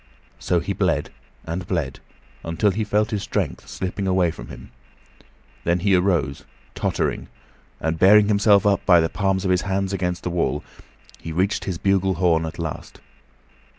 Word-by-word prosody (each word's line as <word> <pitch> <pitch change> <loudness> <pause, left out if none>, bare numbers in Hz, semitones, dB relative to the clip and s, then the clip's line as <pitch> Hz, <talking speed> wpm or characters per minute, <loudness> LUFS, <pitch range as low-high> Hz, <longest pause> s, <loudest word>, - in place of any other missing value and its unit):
So - - +1
he - - -3
bled - - 0 0.3
and 85 +2 -4
bled 75 -8 -2 0.4
until 85 +5 +1
he 110 +3 -2
felt 105 +2 0
his 105 -2 -1
strength - - -3
slipping 95 +1 -4
away 90 -2 +2
from - - -10
him. - - -11 0.9
Then 85 +1 +1
he 100 +1 +2
arose, 90 -7 +1 0.3
tottering, - - -2 0.5
and 80 0 -2
bearing 100 +2 +6
himself 100 -1 +4
up 100 -1 +2
by 90 -3 +6
the 80 0 +1
palms 95 -1 -1
of 95 - +2
his 90 0 +2
hands 95 0 -2
against 90 -2 -2
the 90 - -2
wall, 85 -4 -1 0.6
he 80 - -7
reached 95 +6 0
his 90 -3 -3
bugle 95 0 +1
horn 80 -2 +2
at 80 - -8
last. 80 -3 -6
95 Hz, 165 wpm, -22 LUFS, 85-100 Hz, 0.9 s, bearing